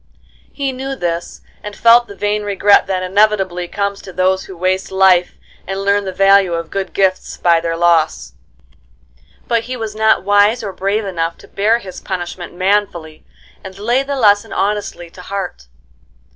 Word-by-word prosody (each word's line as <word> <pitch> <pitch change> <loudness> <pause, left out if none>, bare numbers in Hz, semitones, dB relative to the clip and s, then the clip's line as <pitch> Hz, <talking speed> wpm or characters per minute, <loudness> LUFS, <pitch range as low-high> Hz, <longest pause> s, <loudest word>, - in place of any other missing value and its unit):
He 275 -2 -3
knew 265 +1 -5
this, 170 -6 -4 0.2
and 210 0 -8
felt 235 +1 +5
the 200 - -11
vain 210 +1 -1
regret 205 0 +3
that 185 -1 -2
inevitably 190 -2 +1
comes 200 +1 -3
to 190 - -10
those 185 +1 0
who 190 - -11
waste 185 +2 -1
life 190 -2 +3 0.3
and 195 +1 -3
learn 200 0 +1
the 190 - -3
value 195 -1 +4
of 165 -1 -5
good 195 -1 -4
gifts 190 -1 0
by 170 -1 +3
their 165 0 -3
loss. 165 - +1 1.1
But 230 -1 0
he 255 0 -5
was 220 -2 -5
not 220 -1 +2
wise 205 +4 +3
or 200 -2 -5
brave 200 +3 -1
enough 165 -3 -3
to - - -16
bear 215 +4 +1
his 190 -6 -10
punishment 175 -2 -6
manfully, 185 -4 -1 0.4
and 190 0 -10
lay 240 +6 +1
the 280 +1 -4
lesson 205 -5 +3
honestly 200 -4 -3
to 180 - -12
heart. 180 - -6
195 Hz, 170 wpm, -16 LUFS, 180-210 Hz, 1.1 s, felt